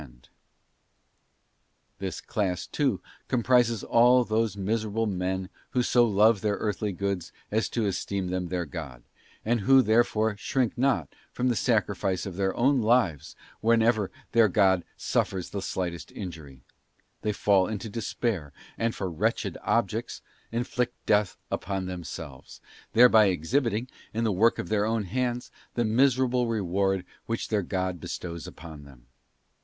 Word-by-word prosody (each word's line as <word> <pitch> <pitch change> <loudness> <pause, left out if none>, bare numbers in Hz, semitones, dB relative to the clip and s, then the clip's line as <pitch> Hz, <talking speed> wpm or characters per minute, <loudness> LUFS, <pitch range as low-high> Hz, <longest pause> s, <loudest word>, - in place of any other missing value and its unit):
on 75 - -10
bold - - -22 1.7
This 95 -1 -4
class, 95 -6 -2
too, - - 0 0.3
comprises 120 -2 +2
all 125 +2 +5
those 110 -2 0
miserable 110 +2 -1
men 95 -1 -2 0.3
who 125 - +4
so 120 -1 +4
shippers. 100 -3 -3
Jove 105 -1 +5
their 105 -1 +1
earthly 105 0 -2
goods 100 -1 -3 0.2
as 110 +2 +1
to 115 -3 -1
esteem 100 -1 -2
them 90 0 -2
their 90 0 -2
god; 70 -7 -8 0.4
and 120 +2 +2
who 135 +6 +6
therefore 110 -1 +2
shrink 125 +3 0
not 120 - 0 0.2
from 125 +1 0
the 120 - +1
sacrifice 100 -5 0
of 95 -3 -6
their 95 0 0
own 135 +1 +3
lives 110 - +1 0.2
whenever 115 -2 +3 0.2
their 115 -1 +5
god 95 -2 +3
suffers 95 -2 -1
the 100 - -3
slightest 85 -6 -4
injury; 80 -9 -8 0.6
they 105 - 0
fall 100 -2 +3
into 110 +1 -4
despair, 105 - -3 0.3
and 115 0 0
for 95 - -3
wretched 85 -3 -1
objects - - -1 0.3
inflict 120 +1 -1
death 105 -2 +2
upon 95 -1 -2
them 90 -1 -5
selves; 70 -3 -9 0.3
thereby 115 -2 +7
exhibiting, 110 - 0 0.3
in 115 - 0
the 110 - +2
work 110 +5 +3
of 85 - -5
their 105 -1 +2
own 110 -1 0
hands, 125 +4 -2 0.2
the 120 - +1
miserable 125 +1 +2
reward 95 -3 0 0.2
which 115 0 -3
their 105 -2 +1
god 95 -1 -2
bestows 85 -1 -6
upon 80 -2 -10
them. 65 -4 -16
105 Hz, 150 wpm, -27 LUFS, 90-115 Hz, 1.7 s, thereby